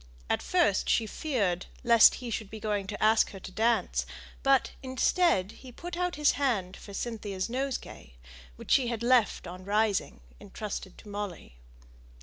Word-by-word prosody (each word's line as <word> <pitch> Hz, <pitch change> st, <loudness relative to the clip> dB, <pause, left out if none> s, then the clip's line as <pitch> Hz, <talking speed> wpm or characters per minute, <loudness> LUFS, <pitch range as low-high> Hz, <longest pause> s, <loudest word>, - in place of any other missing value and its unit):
At -, -, +1 dB
first 340 Hz, -, +2 dB
she 225 Hz, -, +3 dB
feared 210 Hz, -, -1 dB, 0.2 s
lest 235 Hz, -2 st, +7 dB
he 245 Hz, -2 st, -6 dB
might 210 Hz, -, -13 dB
be 220 Hz, -, -8 dB
going 205 Hz, -2 st, -2 dB
to 205 Hz, +1 st, -4 dB
ask 220 Hz, +1 st, +4 dB
her 195 Hz, -, -9 dB
to 190 Hz, -, -9 dB
dance; 225 Hz, +4 st, +1 dB, 0.3 s
but, 270 Hz, -2 st, +3 dB
instead, 260 Hz, -, +2 dB
he 255 Hz, +2 st, -13 dB
put 345 Hz, +7 st, -7 dB
out 360 Hz, 0 st, -1 dB
his 295 Hz, 0 st, +4 dB
hand 210 Hz, -10 st, -1 dB
for 200 Hz, -, -12 dB
Cynthia's 205 Hz, -2 st, -4 dB
nosegay, 250 Hz, -, -4 dB, 0.4 s
which -, -, -8 dB
she 260 Hz, -3 st, +4 dB
had 235 Hz, -1 st, -3 dB
left 245 Hz, -3 st, +3 dB
on 180 Hz, +2 st, -8 dB
rising, 205 Hz, -, 0 dB, 0.2 s
entrusted 205 Hz, -3 st, -7 dB
to -, -, -14 dB
Molly. 200 Hz, -, -6 dB
220 Hz, 160 wpm, -29 LUFS, 195-255 Hz, 0.4 s, lest